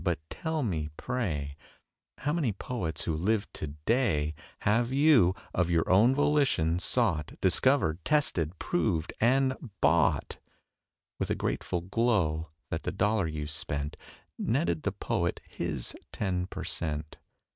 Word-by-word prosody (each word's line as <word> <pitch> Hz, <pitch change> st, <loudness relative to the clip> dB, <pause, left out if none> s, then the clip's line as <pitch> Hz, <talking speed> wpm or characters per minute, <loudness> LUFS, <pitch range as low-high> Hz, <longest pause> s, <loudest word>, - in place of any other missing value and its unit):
But -, -, +1 dB
tell 160 Hz, -2 st, -2 dB
me, 80 Hz, -9 st, -1 dB
pray, 80 Hz, -, -2 dB, 0.7 s
How 145 Hz, +2 st, 0 dB
many 155 Hz, -9 st, +1 dB
poets 95 Hz, -5 st, -4 dB
who 80 Hz, -, -1 dB
live 100 Hz, +6 st, +1 dB
to 75 Hz, -, -5 dB, 0.2 s
day 90 Hz, -, +2 dB, 0.3 s
Have 115 Hz, +3 st, +2 dB
you, 135 Hz, -, +5 dB, 0.2 s
of 90 Hz, -1 st, +1 dB
your 85 Hz, -2 st, +2 dB
own 110 Hz, +8 st, +5 dB
volition, 140 Hz, -, +2 dB
sought, 90 Hz, -, 0 dB
Discovered 95 Hz, -, +3 dB
and 85 Hz, -, -34 dB
tested, 95 Hz, -, +1 dB
proved 95 Hz, -, 0 dB
and 130 Hz, +2 st, +2 dB
bought, 80 Hz, +2 st, +2 dB, 0.8 s
With -, -, -1 dB
a -, -, +1 dB
grateful 90 Hz, -, -2 dB
glow 90 Hz, -6 st, +1 dB, 0.2 s
that -, -, -1 dB
the -, -, -2 dB
dollar 105 Hz, -2 st, +1 dB
you 75 Hz, -1 st, -4 dB
spent 75 Hz, -1 st, -3 dB, 0.4 s
Netted 85 Hz, -2 st, +1 dB
the -, -, -1 dB
poet -, -, -1 dB
his -, -, -4 dB, 0.2 s
ten 90 Hz, -2 st, -1 dB
per -, -, -6 dB
cent.? 75 Hz, -2 st, -3 dB
95 Hz, 135 wpm, -29 LUFS, 80-125 Hz, 0.8 s, you